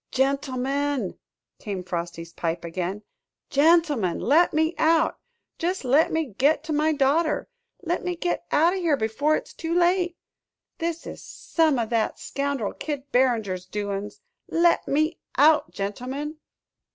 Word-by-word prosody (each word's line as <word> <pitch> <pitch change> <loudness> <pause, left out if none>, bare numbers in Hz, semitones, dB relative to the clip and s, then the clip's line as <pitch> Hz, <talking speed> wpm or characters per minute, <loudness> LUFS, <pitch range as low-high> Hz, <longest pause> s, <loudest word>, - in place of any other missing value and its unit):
"Gentlemen," 275 -2 -1 0.4
came 195 -4 -5
Frosty's 170 -1 -5
pipe 165 0 -3
again, 185 +4 -4 0.5
"gentlemen, 290 - +3
let 320 +7 +4
me 315 +2 +1
out 320 0 +3 0.4
jest 355 -3 -1
let 280 +6 +4
me 320 0 +1
git 290 +3 +3
to 315 -1 -3
my 305 +2 +2
daughter 300 +2 +1 0.4
let 345 0 -1
me 360 0 -2
git 350 +1 -2
out 330 +4 +4
o' - - -2
here 335 -6 +2
before 270 +7 +1
it's - - -5
too 330 +1 -3
late! 355 0 +2 0.6
This 335 -1 -3
is - - -8
some 315 -5 0
o' 235 - +1
that 225 0 0
scoundrel 280 -6 -2
Kid 285 -2 -5
Barringer's 220 -8 +1
doin's. 205 0 -4 0.3
Let 340 +1 +2
me 310 +4 +1 0.2
out, 305 +3 +5
gentlemen!" 260 +10 -4
285 Hz, 140 wpm, -25 LUFS, 220-320 Hz, 0.6 s, out